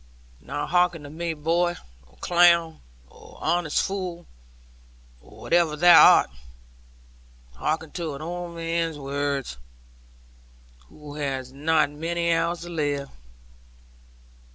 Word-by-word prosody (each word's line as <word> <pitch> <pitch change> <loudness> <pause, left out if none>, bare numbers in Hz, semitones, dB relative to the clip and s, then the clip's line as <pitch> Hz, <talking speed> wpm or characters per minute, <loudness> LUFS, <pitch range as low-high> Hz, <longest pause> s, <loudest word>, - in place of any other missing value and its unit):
Now 145 - -5
hearken 175 -2 +1
to 145 - -10
me, 165 +1 -4
boy, 170 +3 0 0.3
or 65 - -25
clown, 170 -2 +3 0.3
or - - -17
honest 175 -3 0
fool, 185 -3 -5 1.0
or - - -17
whatever 170 -3 +2
thou 175 +2 +8
art; - - -1 1.2
hearken 155 - -3
to 165 -5 -5
an 140 - -9
old 175 +1 -6
man's 165 -1 -2
words, 140 - -3 1.3
who 150 -1 -12
has 135 -3 -4
not 155 +1 +1
many 170 +3 -1
hours 165 +1 -1
to 175 - -8
live. 145 -4 -2
165 Hz, 110 wpm, -24 LUFS, 145-170 Hz, 1.3 s, thou